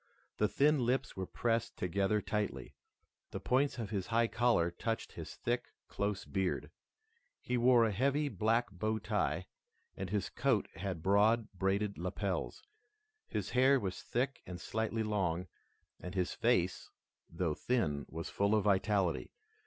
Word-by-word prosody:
The 105 - +3
thin 145 +4 +3
lips 125 +3 0
were 95 -1 -4
pressed 115 -1 -1
together 100 +3 +1
tightly. 105 -2 -2 0.6
The - - -5
points 135 +2 +1
of 110 -4 -4
his 95 -4 -2
high 115 +1 +3
collar 115 -8 +2
touched 115 +5 -3
his - - -8
thick, 120 +1 -1 0.2
close 100 -1 -2
beard. 95 -2 -1 0.7
He 125 - -2
wore 120 -1 +5
a 110 - +1
heavy 140 +8 +1
black 110 -1 +1
bow 110 +4 -1
tie 95 -4 -1 0.5
and 95 -1 -4
his 105 0 -1
coat 125 -4 +1
had 95 -5 -4
broad 105 +4 +4
braided 100 +1 0
lapels. 90 +1 -3 0.6
His - - -3
hair 130 +2 +5
was 95 -5 -4
thick 130 +3 -1
and 90 -1 -6
slightly 110 +3 -1
long, 95 -5 0 0.5
and 90 +2 -7
his 90 -2 0
face, - - +1 0.4
though 80 -1 -1
thin, 75 - 0
was 80 +1 -5
full 100 +2 +2
of 105 - +2
vitality. 95 -3 +2
105 Hz, 145 wpm, -34 LUFS, 95-120 Hz, 0.7 s, wore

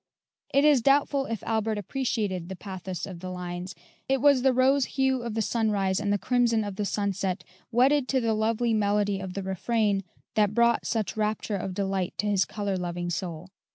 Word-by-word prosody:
It 280 +2 +4
is 290 -5 +5
doubtful 275 +1 +3
if 225 -2 -4
Albert 220 -1 0
appreciated 205 -5 -2
the 190 - -5
pathos 185 -2 -6
of 185 -3 -8
the 185 +1 -6
lines. 180 0 -5 0.3
It 270 0 +2
was 280 -1 +5
the 265 +1 +4
rose 260 +2 +3
hue 265 -1 +2
of 235 -2 -4
the 225 - +1
sunrise 205 -4 +1
and 205 -1 -1
the 205 - +3
crimson 235 0 +2
of 205 -2 -5
the 205 - -2
sunset, 195 -2 -1 0.3
wedded 260 +3 +3
to 265 - +2
the 230 -2 +1
lovely 225 +2 +1
melody 205 -1 +1
of 190 -1 -6
the 200 - -3
refrain, 200 +1 0 0.3
that 210 -1 +2
brought 235 0 +3
such 225 -3 -1
rapture 215 0 -1
of 190 -1 -4
delight 195 -2 -1
to - - -1
his 200 -3 +2
color 205 -2 -3
loving 175 -1 -3
soul. 175 0 -4
210 Hz, 190 wpm, -27 LUFS, 190-235 Hz, 0.3 s, is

